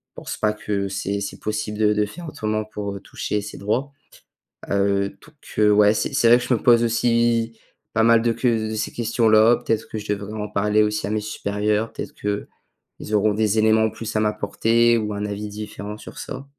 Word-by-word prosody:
pense - - -6
pas 105 - +1
que 100 -2 -3
c'est 100 +1 -3
c'est 100 - -5
possible 110 0 -3
de 105 -1 +4
de 105 0 +1
faire 170 +11 -9
autrement 110 -6 -2
pour, 105 -2 -5
heu, 100 - -6
toucher 105 - -3
ces 105 - -8
droits. 125 +8 -1 0.8
Heu, 100 0 +1
donc, 150 +10 -20 0.2
heu, 105 0 +5
ouais, 105 0 +5
c'est - - -1
c'est 115 - +3
vrai 120 - +7
que 125 - -5
je 125 - +1
me - - -2
pose 120 -1 +5
aussi 115 0 +1 0.3
pas 115 - +2
mal 115 0 +5
de 115 - +2
ques 130 - -5 0.3
de - - -3
ces 110 - -2
questions-là. 115 -1 +4
Peut-être 115 - -2
que 110 - -4
je 105 0 -4
devrais 100 +1 -6
en 105 -1 -4
parler 105 +2 +2
aussi 105 -1 -1
à 105 - -3
mes 110 - 0
supérieurs 105 +1 -1
peut-être - - -6
qu'ils 105 +1 -6
auront 105 0 +3
des 110 0 +1
éléments 110 0 +4
en - - +1
plus 115 -1 -6
à - - +3
m'apporter 115 +2 +2
ou 105 -1 -2
un 105 0 -3
avis 105 +1 -4
différent 105 0 -7
sur - - -11
ça. 135 +2 -7
105 Hz, 215 wpm, -22 LUFS, 105-115 Hz, 0.8 s, vrai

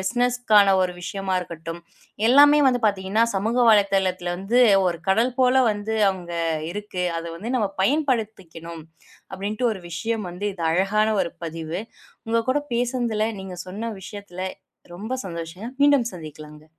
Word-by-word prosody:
பிஸ்னெஸ்க்கான 240 0 +3
ஒரு 180 -1 -1
விஷயமா 195 +1 -3
இருக்கட்டும். 165 -1 -7 0.5
எல்லாமே 290 +3 +7
வந்து 245 -1 +1
பாத்தீங்கன்னா 200 +2 +1
சமூக 215 +5 -1
வலைத்தளத்தில 190 -4 +2
வந்து 195 +7 0 0.3
ஒரு 170 -2 -1
கடல் 230 +6 +3
போல 255 0 +4
வந்து 210 +1 -3 0.2
அங்க 175 -2 -9 0.4
இருக்கு. 205 -2 -5 0.2
அத 165 - -6
வந்து 215 +8 -6
நாம 215 -5 +1
பயன்படுத்திக்கணும் 205 - -2 0.5
அப்டின்ட்டு 210 +5 -1
ஒரு 200 - -7
விஷயம் 210 +5 -3
வந்து 180 +3 -7
இது 175 - -7
அழகான 200 +5 +2
ஒரு 170 - -5
பதிவு. 165 +1 -5 0.5
உங்க 230 +1 +1
கூடப் 290 +1 -1
பேசனதுல 240 -3 0 0.2
நீங்கச் 185 -2 -7
சொன்ன 215 +5 -4
விஷயத்துல 195 -2 -8 0.5
ரொம்ப 215 +8 -6
சந்தோஷம். 170 +5 -6
மீண்டும் 285 -5 +4
சந்திக்கலாங்க. 155 -2 -11
200 Hz, 135 wpm, -23 LUFS, 180-230 Hz, 0.5 s, எல்லாமே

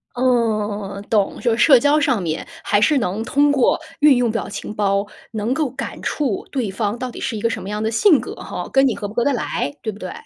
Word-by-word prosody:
嗯。 225 -5 +1 0.3
懂， 205 -3 +1
就 235 -3 +2
社 265 0 +7
交 290 +3 +3
上 265 -8 +1
面 160 -2 -3 0.2
还 205 - +2
是 290 +7 +4
能 205 +1 -2
通 285 +4 +2
过 270 -4 +2 0.2
运 295 -3 +6
用 245 -2 +1
表 225 - -3
情 210 - -6
包， 200 -1 +1 0.3
能 220 +2 -1
够 300 0 0
感 265 +2 -6
触 265 -10 -2
对 250 -7 -1
方 205 +3 -2
到 255 - -3
底 - - -9
是 230 - -3
一 - - -6
个 230 - +1
什 220 - -4
么 190 - -7
样 210 +1 -3
的 220 - 0
性 310 - +5
格， - - -7
吼， - - -6
跟 270 0 +4
你 240 - 0
合 205 - -5
不 205 - -10
合 240 - +1
得 285 - +2
来， 145 - -2
对 220 - -3
不 200 - -12
对？ - - -6
230 Hz, 265 characters per minute, -20 LUFS, 210-265 Hz, 0.3 s, 社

